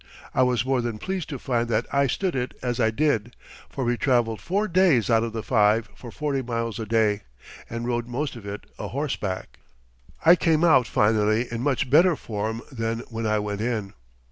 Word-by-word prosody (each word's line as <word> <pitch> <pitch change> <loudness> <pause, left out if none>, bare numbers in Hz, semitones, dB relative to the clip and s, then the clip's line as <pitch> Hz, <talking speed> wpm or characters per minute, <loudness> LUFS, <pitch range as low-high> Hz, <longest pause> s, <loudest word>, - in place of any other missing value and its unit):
I - - +2
was 125 -2 +2
more 130 -1 +1
than 120 -2 -3
pleased 185 - -4
to 140 - -4
find 120 -2 -1
that 110 - +1
I 140 0 +3
stood 180 +6 -1
it 125 -1 -2
as 125 -1 -1
I 110 -2 +3
did, 120 -2 0 0.3
for 135 - -4
we 120 0 +1
traveled 120 -5 +1
four 205 +4 0
days 170 - +3
out 115 -1 +4
of 115 0 -2
the 110 -1 -4
five 110 -1 +2
for 120 - -10
forty 140 +1 -2
miles 115 -2 -3
a 110 - -4
day, 110 -2 +2 0.5
and 115 +1 -4
rode 120 -1 -1
most 135 +3 -3
of 115 - -10
it 100 +1 -6
a - - -4
horseback. 125 -9 -4 0.7
I 170 +2 +9
came 165 -2 +2
out 135 -8 +5
finally 110 +2 +2
in 115 0 -3
much 140 0 0
better 165 +6 +5
form 110 -1 -4
than 115 -2 -2
when 115 -1 -3
I 110 0 +2
went 105 0 -3
in. 110 -4 -2
120 Hz, 200 wpm, -25 LUFS, 110-135 Hz, 0.7 s, I